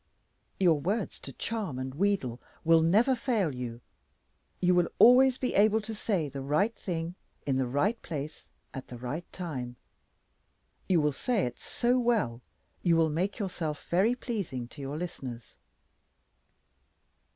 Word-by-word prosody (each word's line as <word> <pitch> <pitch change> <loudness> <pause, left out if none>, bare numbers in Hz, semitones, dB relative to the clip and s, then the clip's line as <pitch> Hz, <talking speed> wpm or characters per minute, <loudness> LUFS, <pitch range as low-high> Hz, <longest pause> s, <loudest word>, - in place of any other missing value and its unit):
Your 170 -5 +4
words 200 +6 -2
to 135 - -8
charm 200 - -3
and 130 0 -4
wheedle 155 -8 0 0.3
will 165 0 +6
never 210 +11 +4
fail 225 - 0
you. 120 -2 -6 0.8
You 180 0 +3
will 175 -1 +3
always 255 +1 +7
be 255 - -1
able 215 +2 +4
to 220 +1 -6
say 200 -7 -1
the 140 0 -6
right 155 - +1
thing 170 -3 -4 0.3
in 135 -2 +1
the 130 -1 +1
right 190 - 0
place 155 -2 -6 0.3
at 135 -2 -7
the 125 - -8
right 135 +8 -5
time. 130 -9 -5 1.1
You 175 -4 +4
will 150 0 +2
say 220 - 0
it 120 -1 -5
so 245 +1 +1
well 215 - +1 0.4
you 170 -1 +3
will 160 -1 +3
make 185 +6 -1
yourself 170 -7 -4
very 200 +8 +3
pleasing 195 - -4
to 145 - -11
your 140 +2 -4
listeners. 130 -9 -6
170 Hz, 150 wpm, -29 LUFS, 135-210 Hz, 1.1 s, always